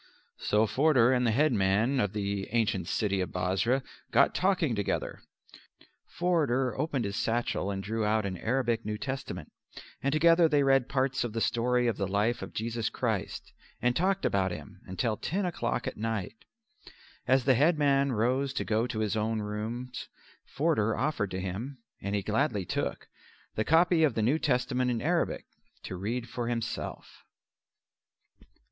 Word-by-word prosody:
So 105 +1 +2
Forder 130 0 +4
and 125 -1 +2
the - - +3
headman 115 -1 +2
of 105 -4 0
the 100 -1 -2
ancient 110 -6 0
city 100 -3 0
of 90 - -2
Bosra 95 +9 0 0.3
got - - +4
talking 180 -8 +1
together. 100 -2 -2 0.9
Forder 140 -9 +1
opened 135 -4 -1
his 100 0 -3
satchel 115 -4 -1
and 95 -1 -3
drew 110 +2 -2
out 105 0 +1
an 95 -2 -3
Arabic 120 +1 0
New 105 0 -3
Testament, 135 +3 -5 0.5
and 140 - 0
together 165 +2 +5
they 145 -2 +3
read 135 -2 +3
parts 130 -2 0
of 120 -3 -4
the 115 - -1
story 125 +2 +1
of 115 -4 0
the 100 - -1
life 105 +5 0
of - - -6
Jesus 115 0 -2
Christ - - -3 0.3
and 125 0 +1
talked 190 +4 +1
about 95 -1 +2
Him 95 +1 -9 0.2
till 115 -3 0
ten 190 +3 -2
o'clock 120 -9 -2
at - - -4
night. 110 -1 -4 0.8
As 130 0 +4
the 135 - +5
headman 140 -1 +3
rose 130 +4 +1
to - - -1
go 110 +2 +1
to 110 -3 -3
his 110 0 0
own 110 +1 0
rooms 110 +4 -5 0.4
Forder 135 -8 +1
offered 135 -9 0
to 95 - -4
him, 100 +9 -5 0.2
and 100 +1 -2
he 100 - -1
gladly 105 -1 0
took, - - -3 0.5
the 110 - 0
copy 165 +4 +4
of 145 -7 +3
the 110 - +1
New 140 +8 +2
Testament 125 -2 +1
in 120 -2 0
Arabic - - 0 0.4
to 95 - -5
read 115 +6 -3
for 120 -1 -4
himself. 120 0 -4
120 Hz, 165 wpm, -29 LUFS, 105-135 Hz, 0.9 s, together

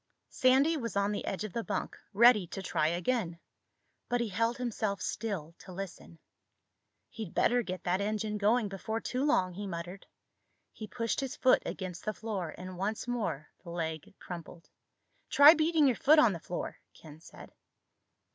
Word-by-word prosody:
Sandy 270 +5 +4
was 230 -6 -4
on 200 +1 +1
the 205 - -3
edge 195 - -3
of 215 - -6
the 230 - -2
bunk, - - -3 0.2
ready 215 -3 +6
to 195 +3 -6
try 155 -4 +1
again. 175 +1 -1 0.7
But 245 - +1
he 235 -2 -1
held 230 +4 0
himself 220 -5 -2
still 195 -8 -4
to 185 - -12
listen. 180 -2 -8 0.9
"He'd 215 -6 -8
better 245 +1 +3
get 185 -4 -6
that 180 +2 0
engine 210 0 -2
going 215 +2 +3
before 200 +3 -4
too 255 +3 -2
long," 190 -12 +2
he 200 +3 -5
muttered. 175 +1 -7 0.6
He 215 - -8
pushed 230 0 -2
his 270 -2 -3
foot 255 - +4
against 185 -2 -5
the 215 - -3
floor 200 -7 -4
and 185 0 -8
once 210 +5 -2
more 215 - -3
the 175 - -10
leg 160 0 -4
crumpled. 170 -1 -10 0.6
"Try 290 +2 +9
beating 315 -1 +3
your 260 -3 +3
foot 305 +3 +5
on 240 -9 +6
the 170 - -5
floor," 175 +2 -5 0.2
Ken 155 -1 -13
said. 165 - -14
205 Hz, 170 wpm, -31 LUFS, 180-240 Hz, 0.9 s, Try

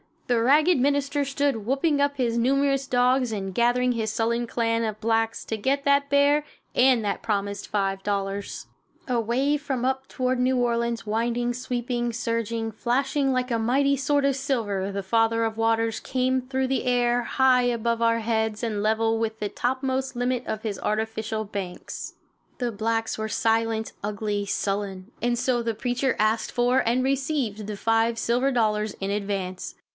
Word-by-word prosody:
The 240 -2 +2
ragged 300 +6 +4
minister 285 +1 +1
stood 275 -5 -1
whooping 280 +3 +1
up 285 0 +2
his 235 -3 0
numerous 275 +2 +2
dogs 250 -1 +2
and 195 -2 -4
gathering 245 +3 +2
his 220 -2 -1
sullen 235 +2 0
clan 230 -1 0
of 215 -1 -3
blacks 225 0 0
to 220 - -3
get 275 +6 0
that 280 0 +3
bear 285 +1 +3 0.3
and 250 -3 +4
that 200 - -1
promised 200 -2 -2
$5. 195 0 -2 0.4
Away 250 +5 +1
from 270 -4 -3
up 265 0 -1
toward 255 0 -1
New 255 +1 +2
Orleans, 235 -1 0
winding, 235 +3 0
sweeping, 240 -1 -2
surging, 230 0 -2
flashing 270 +5 0
like 255 0 -1
a 230 - +1
mighty 275 +5 +2
sword 285 +1 +1
of 275 -1 +2
silver, 220 -9 -1
the 200 0 -3
Father 225 +3 +2
of 225 -1 -2
Waters 225 0 +1
came 260 0 0
through 260 +1 -1
the 265 0 -1
air, 245 -1 +2
high 255 0 +3
above 235 -1 0
our 230 0 +3
heads 220 -1 -1
and 215 -3 -1
level 225 +1 +1
with 220 -1 -2
the 210 - -2
topmost 260 +2 -1
limit 245 0 -1
of 220 0 -3
his 210 -4 -3
artificial 220 0 -2
banks. 200 -4 -6 0.4
The 245 -3 -1
blacks 225 +1 -1
were 220 0 -3
silent, 225 0 0
ugly, 205 0 -2
sullen, 195 0 -2
and 240 0 +1
so 245 0 +1
the 230 -1 -2
preacher 245 +3 0
asked 215 +1 +1
for 245 +2 +3
and 245 +2 +2
received 265 -6 -1
the 210 -1 -5
five 225 +2 +2
silver 245 +4 +1
dollars 215 -3 +1
in 195 +1 -1
advance. 195 -3 -3
235 Hz, 165 wpm, -25 LUFS, 220-260 Hz, 0.4 s, ragged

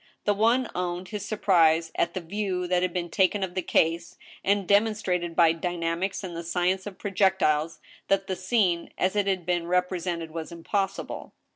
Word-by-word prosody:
The 205 - +3
one 230 +5 +2
owned 180 0 -3
his 210 0 -5
surprise 165 -6 +3
at 170 0 -1
the 185 - -2
view 185 0 -2
that 180 0 +1
had 185 0 0
been 175 -1 -3
taken 195 +2 +2
of 185 -2 -3
the 185 - -1
case, 165 0 +1 0.3
and 200 -1 +1
demonstrated, 200 -5 +1
by 165 -2 +6
dynamics 170 +3 -2
and 175 -3 -6
the 170 - -4
science 180 +3 0
of 195 - -8
pro 205 - -5
jectiles, 170 -5 +2 0.3
that 195 0 +2
the 190 - -2
scene, 185 -3 +1
as 185 +2 +1
it 205 -1 +1
had 185 -3 0
been 175 -1 0
represented, 180 -2 -1
was 165 +1 -6
impossible. 195 +3 -3
180 Hz, 180 wpm, -26 LUFS, 170-195 Hz, 0.3 s, by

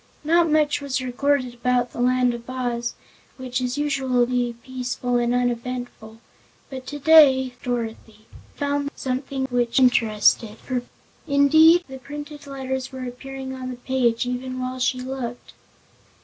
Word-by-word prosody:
Not 335 +2 +3
much 300 -1 +2
was 275 -2 -2
recorded 255 0 0
about 245 0 0
the - - -5
Land 250 0 +3
of 235 +1 -9
Oz, 245 -2 -2 0.4
which 255 -1 -3
is 250 +2 -2
usually 250 -4 +1
peaceful 250 -1 -2
and 240 0 +1
uneventful, 245 -2 -3 0.5
but 260 -1 -7
today 285 -3 +5
Dorothy 225 -3 -5 0.3
found 285 0 -1
something 265 +1 -3
which 240 0 +1
interested 225 -3 +3
her. 255 -2 -1 0.5
Indeed, 315 +4 +6
the 265 -1 -9
printed 295 +2 -9
letters 265 -1 -4
were 260 -1 -6
appearing 265 +1 -7
on 260 -1 -6
the 250 - -5
page 245 -2 0
even 255 +1 -4
while 255 0 -4
she 255 0 +1
looked. 250 -2 -6
255 Hz, 135 wpm, -23 LUFS, 245-275 Hz, 0.5 s, Indeed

